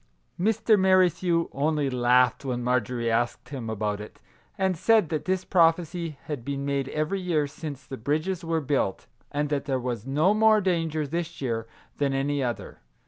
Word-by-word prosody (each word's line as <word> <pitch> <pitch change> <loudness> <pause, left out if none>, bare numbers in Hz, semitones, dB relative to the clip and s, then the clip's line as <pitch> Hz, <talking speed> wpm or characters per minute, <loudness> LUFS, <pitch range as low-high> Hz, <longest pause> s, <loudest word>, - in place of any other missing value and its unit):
Mr. 215 +2 +3
Merri 185 -1 +5
thew 170 0 0
only 150 +1 0
laughed 125 0 +3
when 125 -3 -2
Marjorie 120 -1 0
asked 120 +2 -1
him 130 -5 -5
about 105 -1 -2
it, 105 - -11 0.4
and 190 -1 +1
said 215 0 +3
that 155 -2 -2
this 185 0 0
prophecy 165 -2 +2
had 145 -6 -5
been 140 +1 -3
made 140 -1 -1
every 155 +6 -1
year 165 -5 +1
since 140 -2 -7
the 135 - -7
bridges 155 +9 -1
were 165 -1 0
built, 135 -8 -1 0.3
and 145 0 -1
that 145 -2 -1
there 135 -2 0
was 120 -2 -4
no 155 +9 +3
more 215 0 +5
danger 165 -5 0
this 170 +3 -4
year 115 -4 -2 0.3
than 140 -2 0
any 140 +1 0
other. 120 -2 -4
145 Hz, 175 wpm, -26 LUFS, 125-170 Hz, 0.4 s, Merri